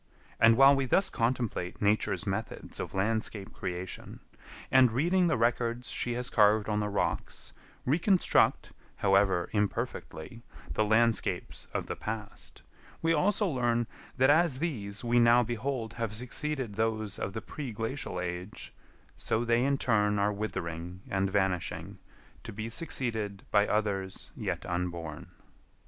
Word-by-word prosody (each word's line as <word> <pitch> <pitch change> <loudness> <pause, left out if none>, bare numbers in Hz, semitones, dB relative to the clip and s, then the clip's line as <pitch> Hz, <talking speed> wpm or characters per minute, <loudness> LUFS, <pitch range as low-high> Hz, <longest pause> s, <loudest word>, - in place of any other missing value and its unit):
And 115 0 +6
while 135 +1 +8
we 135 -1 0
thus 190 +10 +2
contemplate 115 -6 -1
Nature's 105 +1 +1
methods - - -4
of - - -5
landscape 105 0 -1
creation, 90 0 -5 0.5
and, 130 -2 +6
reading 175 +9 +2
the 160 - +2
records 120 +1 0
she 120 - -1
has 125 +1 -2
carved 105 -2 +4
on 105 -1 0
the 105 0 -1
rocks, 100 - -3 0.3
reconstruct, 175 +7 +3 0.2
however 95 -3 +3
imperfectly, 105 -1 -3 0.3
the 110 - +2
landscapes 110 0 +1
of - - -2
the - - -4
past, 110 -1 -6 0.4
we 165 0 +3
also 205 +7 +2
learn 120 -7 +1 0.3
that 130 +2 +5
as 160 -3 +3
these 115 -11 -3
we 120 0 +3
now 120 +1 +6
behold 120 0 -3
have 115 -2 -3
succeeded 125 0 -2
those 110 -1 -1
of 95 - -3
the 110 - -3
pre 140 -5 -6
glacial 115 -2 -3
age, 90 +2 -5 0.4
so 115 +2 0
they 120 +1 +3
in 140 +1 +2
turn 105 -5 +2
are 100 +1 +2
withering 90 -4 -5
and 95 0 +1
vanishing 95 -3 -1 0.4
to 115 - -7
be 110 +2 -5
succeeded 110 - -1
by 105 0 +4
others 100 -3 -2
yet - - -3
unborn. 85 -3 -4
110 Hz, 140 wpm, -30 LUFS, 100-125 Hz, 0.5 s, while